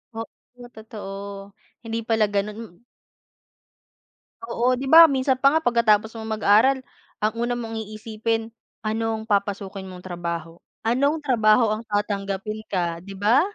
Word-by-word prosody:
Oo 245 +2 -10
totoo, 200 -2 -8 0.3
hindi 225 0 -3
pala 225 -2 +3
ganun 205 +1 -1
m 175 -6 -15 1.7
Oo 250 -5 +1
'di 265 - -4
ba 325 +4 +9
minsan 265 -1 +2
pa 275 +3 +5
nga 320 - -3
pagkatapos 220 -2 +3
mong 220 -1 -5
mag-aral 215 +6 +4 0.4
ang 215 0 0
una 240 +1 -2
mong 225 -2 -5
iisipin, 225 +1 -3 0.3
anong 220 0 -1
papasukin 200 -2 -2
mong 180 0 -11
trabaho, 170 -2 -5 0.2
anong 280 +7 +2
trabaho 220 -3 +4
ang 215 - -4
tatanggapin 205 0 -2
ka 170 -3 -1
'di 195 +2 -10
ba? 220 +8 +4
215 Hz, 135 wpm, -23 LUFS, 200-235 Hz, 1.7 s, ba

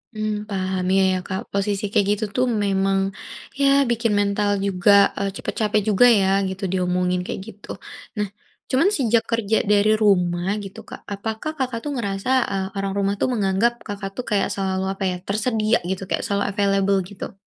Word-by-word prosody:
Mmm, 215 -1 -2
paham, 190 -1 -2
iya, 195 0 +4
ya, - - 0
Kak, 190 -1 -3
posisi 200 0 -1
kayak 210 -3 +3
gitu 210 +1 0
tuh 255 0 +3 0.2
memang, 195 0 +1 0.6
ya 275 - +5 0.2
bikin 230 -2 +1
mental 205 0 +1 0.2
juga, 195 +1 +3 0.3
eee, 200 0 -1
cepat - - -4
capek 210 0 +2
juga 210 +4 +5 0.2
ya 190 - +2 0.2
gitu 190 +1 -7
diomongin 180 -1 0
kayak 190 - -5
gitu. 205 -1 -14 0.5
Nah, 210 -1 0 0.4
cuman 295 +9 +3
sejak 235 -4 +2
kerja 220 -1 +1
dari 205 +1 +4
rumah 180 -3 +2 0.2
gitu 195 - -9
Kak, - - -9
apakah 220 +8 -4
Kakak 255 -3 -2
tuh 295 - -3
ngerasa, 200 -1 -3 0.2
eee, 190 -1 -1
orang 195 0 -2
rumah 200 0 +1
tuh - - +4
menganggap 205 +2 +2
Kakak 200 -1 -5
tuh - - -1
kayak 205 -2 +2
selalu, 190 -1 -1
apa 195 - -6
ya, 180 - -2
tersedia 215 +2 +1
gitu, 190 0 -2
kayak - - 0
selalu 200 0 0
available 195 -1 +2
gitu? 205 - -8
200 Hz, 180 wpm, -22 LUFS, 195-215 Hz, 0.6 s, ya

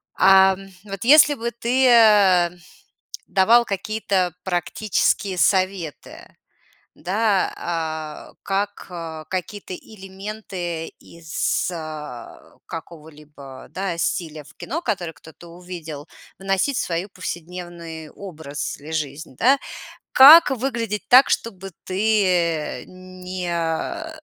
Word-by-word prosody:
Ам, 190 0 +5 0.2
вот 195 -2 -6
если 295 +4 +7
бы 235 -3 -4
ты, 245 +3 +1
э, 205 -7 +6 0.8
давал 225 +5 +4
какие-то 195 -3 -1
практические 190 +1 -1
советы, 185 -5 -1 0.6
да, 200 +2 0
а, 160 -2 -5
как 200 +1 -3 0.4
какие-то 190 +1 -5
элементы 190 -4 -7
из, 170 +2 -3
а, 155 -7 -9
какого-либо, 150 -4 -11
да, 190 -3 -3
стиля 160 -2 -3
в - - -18
кино, 320 +7 -5
который 190 - -3
кто-то 160 +2 -15
увидел, 170 -4 -9 0.3
вносить 195 +7 0
в - - +1
свою 175 +2 -3
повседневный 175 -3 -7
образ 160 -7 -7
или 150 +2 -11
жизнь, 150 -2 -4
да. 270 +3 +4 0.5
Как 295 +4 +9
выглядеть 235 -5 -3
так, 255 +2 +7
чтобы 195 -4 -3
ты 185 -6 0
не 185 - -4
185 Hz, 95 wpm, -22 LUFS, 165-210 Hz, 0.8 s, Как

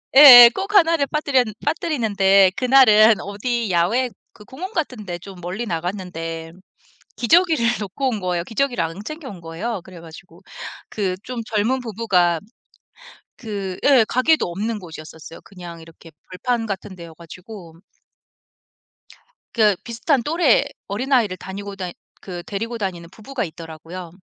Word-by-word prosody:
예예 245 -4 +11
꼭 395 +2 -4
1 335 -4 +5
를 285 -3 0
빠뜨렸 280 -5 +1 0.2
빠뜨리는데 205 - +2
그날은 230 -5 +5
어디 225 +3 -3
야외 220 +10 +1 0.2
그 210 - -16
공원 370 +10 -8
같은 255 - -4
데 175 -1 -5
좀 190 0 -12
멀리 185 +7 -5
나갔는데 165 -3 -5 0.7
기저귀를 320 +1 +3 0.2
놓고 235 +7 -3
온 220 -5 -3
거예요. 180 -2 -2
기저귀를 245 0 -1
안 165 +3 -6
챙겨 310 -1 -8
온 180 -4 -11
거예요. 180 +6 -5
그래 185 -3 -13
가지고 165 +1 -14 0.5
그 195 -4 -2
좀 250 -1 -5
젊은 225 +5 -1
부부가 190 -7 0 1.0
그 200 -5 -6
예 270 -5 +6
가게도 310 +5 +2
없는 210 +4 -3
곳이었었어요 160 -2 -11
그냥 175 -3 -11
이렇게 165 0 -16 0.2
벌판 230 +5 -2
같은 195 -2 -6
데여 170 -2 -11
가지고. 170 0 -13 1.7
그 210 -5 +3
비슷한 240 +3 -1
또래 310 -2 +2 0.2
어린아이를 225 -3 0
다니고 195 +2 -8
다니 180 -2 -6 0.3
그 175 -2 -8
데리고 230 +4 -5
다니는 175 -5 -5
부부가 240 +4 -5
있더라고요. 165 +1 -9
205 Hz, 305 characters per minute, -21 LUFS, 175-250 Hz, 1.7 s, 예예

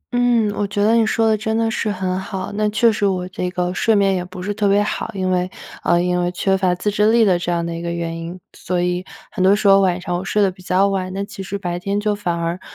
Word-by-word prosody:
嗯， 240 -3 +3
我 205 0 -1
觉 205 0 -1
得 220 - +4
你 230 -1 +4
说 225 0 +2
得 220 - +4
真 220 +1 -2
的 225 0 +1
是 220 - -1
很 185 -1 -2
好。 190 -2 -5
那 210 +1 0
确 230 +2 +3
实 210 - -3
我 180 -2 -1
这 180 0 -3
个 180 0 -2
睡 220 +3 +2
眠 195 -1 +3
也 180 -1 -1
不 180 0 -9
是 205 +2 -2
特 205 0 0
别 200 +1 +3
好， 215 - -3
因 185 -1 -1
为 180 0 0 0.3
呃， 175 0 +2
因 180 0 +1
为 175 0 0
缺 190 +1 +1
乏 185 -2 +1
自 205 +4 -1
制 210 +2 +3
力 230 -1 +5
的 185 -3 +3
这 175 - -2
样 170 -1 -1
的 170 - -4
一 165 - -5
个 170 - -3
原 170 -1 -3
因， 170 +2 -7 0.2
所 180 0 -2
以 180 0 -1 0.3
很 195 -4 -1
多 195 +2 +5
时 205 0 0
候 195 0 +7
晚 185 -1 +1
上 180 -1 -3
我 180 - -3
睡 210 +2 +1
得 195 - +2
比 185 0 -16
较 185 +2 +2
晚， 185 -2 -2
那 195 +1 -2
其 195 - -9
实 195 +1 -4
白 175 -3 -4
天 200 +3 -1
就 210 0 0
反 195 -4 -2
而 170 +2 -2
190 Hz, 310 characters per minute, -20 LUFS, 180-205 Hz, 0.3 s, 候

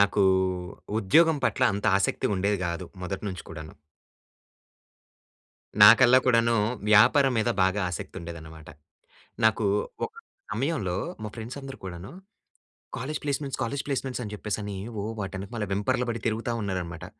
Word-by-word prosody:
నాకు 100 0 +3 0.8
ఉద్యోగం 160 - +4
పట్ల - - 0
అంత 100 +1 -4
ఆసక్తి 100 - 0
ఉండేది 100 +2 0
కాదు. 85 0 -4 0.2
మొదటి 95 +3 -4
నుంచి 90 -2 -6
కూడాను. 80 -1 -9 2.1
నాకల్లా 120 +4 +8
కూడాను, 115 -2 +3 0.4
వ్యాపారం 130 +6 +6
మీద 110 +2 +1
బాగా 95 +2 +1
ఆసక్తి 90 - -6
ఉండేదనమాట. 80 -2 -10 0.8
నాకు 110 0 +3 0.4
ఒక 450 - -6 0.4
సమయంలో 130 - -1 0.3
మా 105 - -4
ఫ్రెండ్స్ 120 +4 -7
అందరూ 135 0 -8
కూడాను, 90 +1 -7 0.9
"కాలేజ్ 145 +6 -4
ప్లేస్మెంట్స్, 140 -2 -2
కాలేజ్ 135 +4 -3
ప్లేస్మెంట్స్ 135 -2 -2
అని 105 - -6
చెప్పేసి 105 +1 -3
అని 100 -1 -5 0.2
ఓ - - -4 0.2
వాటి 95 -1 -4
వెనకమాల 105 +3 -4
వెంపర్లు 105 +5 0
పడి 115 - -2
తిరుగుతా" 115 +2 -2
ఉన్నారనమాట. 90 -5 -4
105 Hz, 135 wpm, -26 LUFS, 95-125 Hz, 2.1 s, నాకల్లా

